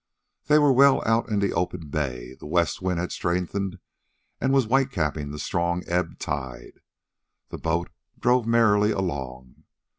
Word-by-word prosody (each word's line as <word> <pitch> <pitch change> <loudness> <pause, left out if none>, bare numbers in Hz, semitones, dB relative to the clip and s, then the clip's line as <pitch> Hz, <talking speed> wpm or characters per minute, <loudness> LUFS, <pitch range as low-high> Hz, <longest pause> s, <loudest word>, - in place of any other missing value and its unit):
They 150 - +5
were 145 -2 +5
well 140 +1 +5
out 115 +1 +1
in 105 - 0
the 100 - 0
open 85 -2 -3
bay. 65 -4 -3
The 65 - -11
west 85 +2 0
wind 90 -2 -1
had 90 - -3
strengthened 90 +2 -2 0.6
and 135 - +1
was 135 -3 +3
whitecapping 100 - 0
the 75 - -7
strong 85 +3 -1
ebb 90 -1 -1
tide. 60 -3 -6 0.7
The - - -7
boat 85 +2 -1 0.3
drove 125 -1 +2
merrily 110 -3 +4
along. 65 - -4
90 Hz, 150 wpm, -25 LUFS, 75-115 Hz, 0.7 s, They